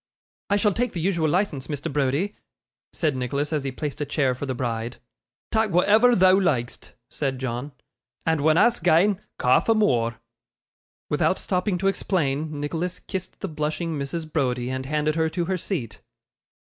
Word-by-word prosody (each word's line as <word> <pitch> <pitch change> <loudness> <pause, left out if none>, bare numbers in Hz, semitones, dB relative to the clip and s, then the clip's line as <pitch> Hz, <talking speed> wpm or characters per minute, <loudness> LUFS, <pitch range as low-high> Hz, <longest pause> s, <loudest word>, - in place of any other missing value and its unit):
'I 205 - +3
shall 205 0 +2
take 245 +2 -1
the 175 - -3
usual 165 -2 +1
licence, 170 -6 0
Mr. 145 -2 -4
Browdie,' 145 +8 0 0.6
said 155 -5 0
Nicholas, 140 +4 -2
as 150 -3 0
he 135 - -2
placed 145 +2 -5
a - - +2
chair 135 -3 +1
for 135 +3 -5
the 130 - -2
bride. 115 -1 -3 0.5
'Tak' 220 -1 +2
whatever 215 +7 +5
thou 185 0 +6
like'st,' 130 -10 -1
said 135 -1 -2
John, 125 +2 -4 0.5
'and 160 -2 +1
when 155 +2 +4
a's 240 +5 +4
gane, 185 +4 +3 0.2
ca' 125 - +4
for 225 - +2
more.' 120 - +1 0.9
Without - - +2
stopping 180 +1 -1
to 195 +2 0
explain, 155 -6 -1
Nicholas 165 +5 -2
kissed 185 -1 -6
the 195 - -2
blushing 155 0 -2
Mrs. 155 +3 -4
Browdie, 125 -4 0
and 130 0 -4
handed 150 +1 +1
her 160 0 +1
to 170 +2 -2
her 190 +2 0
seat. 165 - -4
155 Hz, 170 wpm, -24 LUFS, 135-185 Hz, 0.9 s, thou